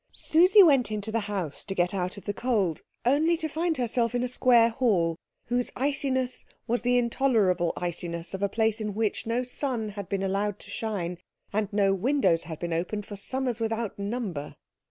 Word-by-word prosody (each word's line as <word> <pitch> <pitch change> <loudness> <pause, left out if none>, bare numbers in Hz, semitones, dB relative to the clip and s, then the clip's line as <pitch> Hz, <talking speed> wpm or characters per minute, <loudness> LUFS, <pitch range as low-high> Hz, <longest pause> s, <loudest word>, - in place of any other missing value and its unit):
Susie 365 +6 +6
went 275 - +4
into 215 0 -3
the 230 - +1
house 185 -8 -4
to 195 - -5
get 175 0 +1
out 185 0 -2
of 200 - -11
the 205 - -2
cold, 205 -8 0 0.2
only 310 +7 +3
to 320 -1 -2
find 320 +1 -1
herself 240 -1 0
in 245 - +1
a - - 0
square 240 -2 +5
hall 205 -9 +1 0.3
whose 245 +1 0
iciness 260 -2 -1 0.2
was 240 -1 0
the 245 +1 +2
intolerable 225 -8 +2
iciness 170 0 -4
of 190 - -4
a 200 - +1
place 220 +1 +1
in 210 -2 -3
which 220 0 -1
no 235 +2 0
sun 250 -3 -2
had 200 -2 -7
been 195 -1 -1
allowed 195 +1 -1
to - - -12
shine 180 -6 -3 0.3
and 210 0 0
no 200 -1 +3
windows 195 - +2
had 160 -1 -6
been 170 +1 -3
opened 190 +5 -2
for 205 - -8
summers 250 +3 -2
without 225 -2 -2
number. 200 -8 -4
220 Hz, 190 wpm, -27 LUFS, 195-250 Hz, 0.3 s, Susie